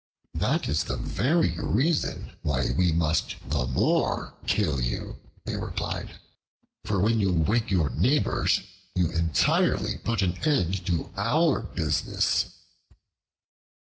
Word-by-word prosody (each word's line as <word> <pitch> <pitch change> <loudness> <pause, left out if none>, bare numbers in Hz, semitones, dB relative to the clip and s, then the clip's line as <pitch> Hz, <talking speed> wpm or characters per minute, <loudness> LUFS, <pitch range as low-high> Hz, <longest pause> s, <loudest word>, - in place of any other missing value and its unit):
"That - - 0
is 75 +2 0
the 65 - -3
very 130 - +1
reason 145 +8 0
why 65 -4 0
we 90 +2 +3
must 80 0 +1
the 65 -3 0
more 65 - +1
kill 80 -11 +1
you," - - -3 0.3
they - - -3
replied; - - -4 0.6
"for 105 -2 -1
when 110 +4 +3
you 100 -3 +2
wake 105 +8 +1
your 80 -8 +1
neighbors, 140 - +2 0.3
you 90 -3 +1
entirely 85 -1 +1
put 115 -4 0
an 90 -1 -1
end 95 - +1
to 85 -3 -1
our 135 +9 +2
business." 85 -8 0
90 Hz, 120 wpm, -26 LUFS, 80-115 Hz, 0.6 s, we